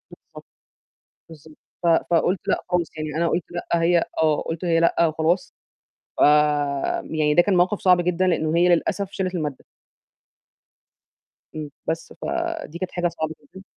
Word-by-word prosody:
بالضبط - - -15 0.9
بالضبط 155 -1 -15 0.3
ف - - -1 0.2
فقُلت 175 +2 +2
لأ - - +1
خالص 180 -2 0
يعني 155 -1 -5
أنا 170 0 +1
قُلت 170 0 -1
لأ، 175 - -5 0.2
هي 170 0 +3 0.2
آه، 155 -2 +2
قُلت 165 +2 -5
هي 165 -1 +2
لأ 170 0 +3
وخلاص 160 +3 -1 0.6
ف - - -2 0.9
يعني 150 -1 +1
ده 175 - +6
كان 195 -2 +1
موقف 185 +3 +2
صعب 180 -1 +4
جدًا، 180 +1 0
لإنه 160 -2 +1
هي 175 +1 +4
للأسف 180 +3 +1
شالت 185 -1 -3
المادة. 150 -5 -4 1.9
إمم، 150 -2 -5 0.2
بس 165 0 -3
فَدي 170 - -3
كانت 185 - -4
حاجة 175 -1 0
صعبة 160 -2 -4 0.2
جدًا. 190 - -10
170 Hz, 155 wpm, -23 LUFS, 160-180 Hz, 1.9 s, ده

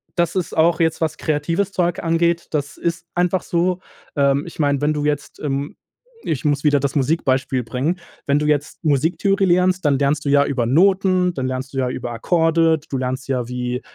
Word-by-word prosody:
das 170 0 0
ist 180 -2 -2
auch 165 +1 +3
jetzt 165 -1 +1
was 160 -2 -1
kreatives 165 +6 -1
Zeug 175 -2 0
angeht, 170 0 +1
das 145 -2 -3
ist 170 0 -3
einfach 180 +1 +1
so. 180 +1 0 0.4
Ähm, 140 -1 +2
ich 170 - -11
meine, 145 -1 +1
wenn 150 +1 +2
du 150 -1 -2
jetzt, 145 -1 -2
ähm 140 0 -3 0.5
ich 145 - -2
muss 145 -1 0
wieder 145 -2 +4
das 140 +1 -2
Musik-Beispiel 130 -3 0
bringen. 130 +10 -2 0.3
Wenn 140 +1 +2
du 150 - -1
jetzt 150 +1 -1
Musiktheorie 175 +7 +1
lernst, 180 0 +2
dann 140 -2 +3
lernst 145 +2 0
du 140 - 0
ja 140 0 +5
über 125 -5 -1
Noten, 185 +5 +3
dann 130 -4 -3
lernst 130 +1 -4
du - - -6
ja 130 -1 +1
über 120 -1 -4
Akkorde, 165 +5 +2
du 135 - -2
lernst 130 +1 -3
ja 125 -3 -1
wie 125 0 -3
150 Hz, 200 wpm, -20 LUFS, 135-170 Hz, 0.5 s, ja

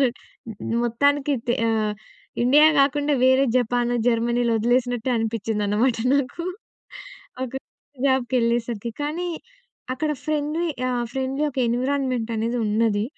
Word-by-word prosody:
ఒదిలేసినట్ 250 -3 +1 0.6
మొత్తానికి 285 +5 +1
దె 240 - +2
ఆహ్, 215 -1 0 0.5
ఇండియా 290 +5 +6
కాకుండా 290 +1 +2
వేరే 260 +1 +5
జపానొ, 245 0 +1
జర్మనీలో 235 0 +1
వదిలేసినట్టే 245 +1 +1
అనిపించిందనమాట 225 +1 0 0.2
నాకు. 280 +4 -1 1.0
ఒక 260 - -8 0.5
జాబ్‌కెళ్ళేసరికి. 235 -3 0
కానీ, 335 +5 -2 0.6
అక్కడ 300 +4 -2
ఫ్రెండ్లీ, 310 +2 -1 0.2
ఆహ్, 245 -1 -1
ఫ్రెండ్లీ 265 +2 -1
ఒక 265 - -8
ఎన్విరాన్మెంటనేది 245 -2 -1
ఉన్నది. 210 -1 +1
245 Hz, 100 wpm, -23 LUFS, 230-275 Hz, 1.0 s, ఇండియా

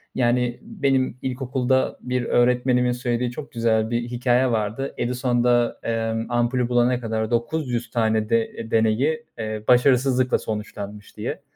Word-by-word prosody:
Yani, 120 -1 +1
benim 140 - 0
ilkokulda 130 0 0
bir 125 0 -1
öğretmenimin 125 +1 +2
söylediği 125 0 -1
çok 140 +4 -8
güzel 110 -2 +1
bir 120 0 0
hikâye 125 +1 +1
vardı. 110 +4 -2
Edison 125 0 0
da, 120 -1 +2
emm, 115 0 -2
ampulü 120 +1 +1
bulana 120 0 +2
kadar 110 -1 -2
900 120 0 -1
tane 110 -2 +1
de 115 0 +3
e, 115 - -7
deneyi, 115 +8 +2 0.2
eee, 110 -1 -4
başarısızlıkla 125 0 +4
sonuçlanmış 105 -1 -7
diye. - - -4
120 Hz, 135 wpm, -23 LUFS, 115-125 Hz, 0.2 s, başarısızlıkla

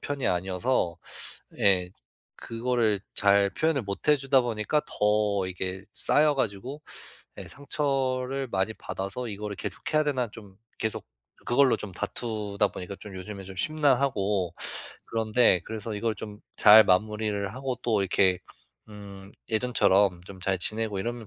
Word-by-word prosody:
편이 145 -3 -3
아니어서 90 0 0 0.6
예. 90 -3 +4 0.5
그거를 115 -3 0 0.2
잘 100 0 +4
표현을 155 0 0
못 100 +7 -5
해 150 - +6
주다 135 -1 +3
보니까 120 +5 0
더 105 -2 +1
이게 95 +1 -4
쌓여 150 -1 +3
가지고 130 +5 -3 0.6
예, - - -6
상처를 135 -2 -1
많이 95 +3 0
받아서 100 +6 -5
이거를 105 0 -5
계속해야 155 -1 -1
되나 130 -5 0
좀 105 -4 -13 0.2
계속 110 -1 -3 0.4
그걸로 130 +1 +4
좀 105 - -7
다투다 105 -2 -2
보니까 90 +2 -7
좀 100 -3 -9
요즘에 95 +1 -7
좀 95 0 -10
심란하고 125 - +1 0.5
그런데 110 -4 +3
그래서 110 0 -5
이걸 110 +1 -1
좀 105 +1 -8 0.2
잘 110 +1 +9
마무리를 105 +1 +1
하고 130 -2 -3
또 110 -4 +1
이렇게 95 -1 +3 0.5
음 100 -1 -11 0.2
예전처럼 100 -6 +3
좀 95 0 -11
잘 95 +1 0
지내고 110 +1 0
이러면 120 +1 -4
105 Hz, 290 characters per minute, -27 LUFS, 100-125 Hz, 0.6 s, 잘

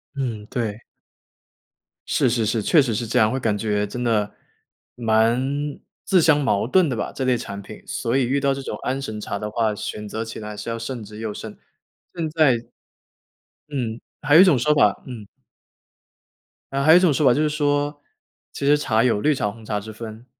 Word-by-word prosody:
嗯， 120 -6 -3
对。 110 -2 -3 1.3
是 130 - +2
是 115 -1 0
是， 110 +1 0
确 150 - +4
实 125 -4 -1
是 120 - -2
这 125 - +1
样， 110 0 +4
会 130 - -1
感 110 -4 0
觉 105 -1 0
真 120 +4 -5
的 110 -3 0 0.6
蛮 115 +1 +2 0.6
自 185 -3 +3
相 155 -2 +4
矛 115 -7 +1
盾 180 +4 +3
的 125 - -1
吧， - - -3
这 135 - -4
类 130 -1 +2
产 100 -3 -7
品。 - - -12
所 115 +2 -2
以 135 - +2
遇 135 +4 +1
到 140 0 +1
这 135 - -5
种 110 - -5
安 135 +1 -2
神 110 -5 -5
茶 100 - -4
的 105 +1 -4
话， 110 0 0
选 105 +1 -5
择 110 +2 -4
起 110 - -7
来 105 -1 -7
是 105 +3 -6
要 115 - -2
慎 115 0 -5
之 105 +1 -11
又 110 -2 -4
慎。 105 0 -8 0.6
现 165 -2 -2
在 155 -4 +4 1.2
嗯， 120 -6 -3 0.2
还 145 - +3
有 165 - +10
一 - - +10
种 180 -8 +5
说 150 +5 +2
法 105 -9 +3
嗯。 115 -5 -8 1.5
呃， 135 - 0
还 155 +3 +5
有 - - +9
一 - - +6
种 175 -5 +4
说 150 +2 +1
法 125 - +6
就 145 - +1
是 155 - +2
说， 145 -1 0 0.5
其 - - -4
实 145 +1 +5
茶 115 -6 +1
有 120 -5 +2
绿 150 +7 +2
茶 105 -5 -1
红 115 +1 -14
茶 105 -1 -2
之 105 +2 -6
分， 110 +1 -9
120 Hz, 225 characters per minute, -22 LUFS, 110-140 Hz, 1.5 s, 有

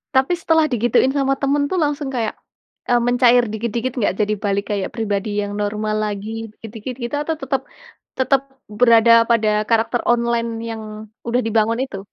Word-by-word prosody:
Tapi 265 +6 +3
setelah 320 -1 +3
digituin 245 0 +2
sama 275 -1 +1
teman 285 +1 0
tuh 375 - -1
langsung 290 -1 -2
kayak, 235 -5 -2 0.6
eee, 245 - +4
mencair 245 0 +5
dikit-dikit 235 +3 -2
enggak 205 -5 +1
jadi 210 0 +1
balik 200 0 0
kayak 200 -2 -2
pribadi 210 -3 -2
yang 205 0 -4
normal 215 +1 -2
lagi 205 0 -4 0.2
dikit-dikit 225 +3 -8
gitu 240 +4 -3
atau 320 +1 -2
tetap 270 -2 -2 0.6
tetap 265 +1 +2 0.4
berada 235 -1 +6 0.2
pada 225 -2 +3 0.2
karakter 230 +1 +1
online 235 -1 +1 0.2
yang 225 -1 -5 0.5
udah 245 +2 +1
dibangun 225 +1 +1
itu? 195 -7 -8
235 Hz, 160 wpm, -20 LUFS, 215-265 Hz, 0.6 s, berada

